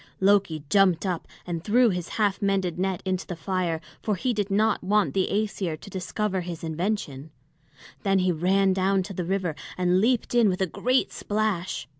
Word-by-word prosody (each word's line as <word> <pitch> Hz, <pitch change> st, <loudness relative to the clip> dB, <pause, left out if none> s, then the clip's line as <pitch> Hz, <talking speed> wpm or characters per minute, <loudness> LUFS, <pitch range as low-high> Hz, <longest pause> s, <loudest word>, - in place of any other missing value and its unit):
Loki 190 Hz, -6 st, +2 dB
jumped 195 Hz, -1 st, +3 dB
up 180 Hz, -3 st, -2 dB, 0.2 s
and 170 Hz, -2 st, -4 dB
threw 235 Hz, +3 st, +4 dB
his 180 Hz, -1 st, -4 dB
half 205 Hz, -3 st, +1 dB
mended 190 Hz, -3 st, 0 dB
net 190 Hz, -1 st, -1 dB
into 185 Hz, 0 st, -2 dB
the 180 Hz, -, -4 dB
fire, 175 Hz, -1 st, -1 dB, 0.2 s
for 210 Hz, -, 0 dB
he 250 Hz, +6 st, -1 dB
did 205 Hz, -2 st, -1 dB
not 215 Hz, +1 st, +2 dB
want 210 Hz, +2 st, +2 dB
the 190 Hz, -1 st, +1 dB
Æsir 200 Hz, -6 st, -1 dB
to -, -, -11 dB
discover 190 Hz, +1 st, -2 dB
his 170 Hz, -2 st, -7 dB
invention; 160 Hz, -4 st, -3 dB, 0.7 s
then 195 Hz, -1 st, +2 dB
he 185 Hz, -1 st, +2 dB
ran 190 Hz, +4 st, +2 dB
down 190 Hz, 0 st, +2 dB
to 195 Hz, +2 st, -7 dB
the 180 Hz, -, -3 dB
river 185 Hz, -2 st, -1 dB, 0.2 s
and 180 Hz, +1 st, +2 dB
leaped 240 Hz, +2 st, +1 dB
in 235 Hz, -3 st, +5 dB
with 185 Hz, -, -1 dB
a 190 Hz, -, +2 dB
great 255 Hz, +8 st, 0 dB
splash. 205 Hz, -, -2 dB
190 Hz, 185 wpm, -26 LUFS, 180-205 Hz, 0.7 s, in